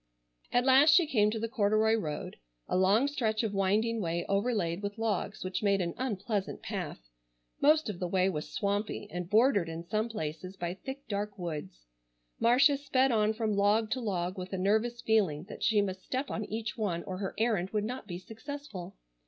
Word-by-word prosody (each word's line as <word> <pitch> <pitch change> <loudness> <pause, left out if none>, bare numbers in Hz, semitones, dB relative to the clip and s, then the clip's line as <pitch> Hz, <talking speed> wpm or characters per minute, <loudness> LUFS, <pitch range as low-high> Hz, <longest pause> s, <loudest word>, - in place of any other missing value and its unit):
At 245 +1 +2
last 275 +4 +7
she 350 - +6
came 215 -9 +3
to 220 - -2
the 225 +1 -2
corduroy 215 -1 +2
road—a - - -4
long 195 +7 +4
stretch 235 -6 0
of 215 -2 -1
winding 210 +4 +1
way 170 -1 -1
overlaid 200 -4 0
with 205 +1 -4
logs 215 -2 -2
which 185 0 -3
made 200 -2 +3
an 170 -2 -1
unpleasant 210 -4 -3
path. - - -5 0.5
Most 305 +2 +5
of 200 -5 -4
the 180 - -1
way 185 +1 +2
was 150 -5 -3
swampy, 205 0 -2
and 180 0 -4
bordered 210 -5 +4
in 165 +1 -5
some 215 +4 0
places 185 -1 -5
by 175 -1 -3
thick, 265 +8 -8
dark 205 0 -3
woods. 150 - -6 0.5
Marcia 265 +5 +5
sped 270 -2 +2
on 215 -2 +3
from 220 -2 -1
log 210 +2 +2
to 260 - 0
log, 185 -3 -2
with 185 +1 -6
a - - -1
nervous 220 +5 +1
feeling 190 -9 +2
that 195 - -10
she 220 -3 +3
must 190 -1 -4
step 265 +2 -3
on 215 - -3
each 220 +1 -4
one 190 -7 -2
or 185 -1 -5
her 195 -2 -4
errand 215 -5 +1
would 210 0 -1
not 245 -1 -5
be 175 -3 -5
successful. 225 0 -8
210 Hz, 190 wpm, -30 LUFS, 185-230 Hz, 0.5 s, last